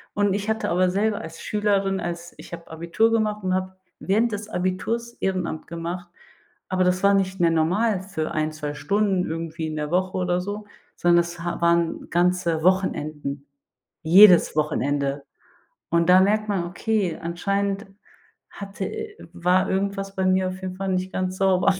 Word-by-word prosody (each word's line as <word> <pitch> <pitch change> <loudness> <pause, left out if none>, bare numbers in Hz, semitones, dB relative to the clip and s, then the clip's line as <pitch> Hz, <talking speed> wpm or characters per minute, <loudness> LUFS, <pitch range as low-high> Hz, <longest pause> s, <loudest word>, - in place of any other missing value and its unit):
Und 205 -1 +2
ich 205 0 -3
hatte 220 - -1
aber 180 +2 +2
selber 205 +2 0
als 165 0 -9
Schülerin, 200 -2 0
als 170 0 -5
ich - - -12
hab 165 0 -9
Abitur 170 +8 +1
gemacht 215 -2 0
und 185 - +1
hab 185 0 -4 0.2
während 220 +4 +1
des 210 +1 -5
Abiturs 215 +6 -2
Ehrenamt 185 -4 -2
gemacht. 170 +1 -5 0.6
Aber 185 -1 +1
das 180 0 +1
war 200 - +5
nicht 190 -1 0
mehr 170 -1 +4
normal 185 +5 +1
für 170 -5 -4
1, 155 -1 -1
2 150 -1 -5
Stunden 200 +1 +1
irgendwie 165 0 -4
in 155 - -5
der 150 -1 -3
Woche 185 +1 0
oder 180 0 0
so, 205 +2 -6 0.3
sondern 175 0 +4
es 170 0 -7
ha 175 0 -3
waren 170 -1 +1
ganze 175 -2 +1
Wochenenden, 150 -6 0 0.6
jedes 180 +2 +7
Wochenende. 145 -2 0 0.7
Und 170 0 +2
da 185 +1 +8
merkt 215 +2 +2
man, 195 -4 0
okay, 195 0 -1
anscheinend 200 +4 -2 0.6
hatte 195 -1 -6
i 440 -1 -6 0.2
war 185 +2 +2
irgendwas 195 0 -2
bei 190 - 0
mir 185 0 +2
auf 185 0 -6
jeden 185 -1 -5
Fall 195 0 -3
nicht 185 0 -1
ganz 185 0 -2
sauber. 190 0 +3
185 Hz, 170 wpm, -24 LUFS, 170-200 Hz, 0.7 s, da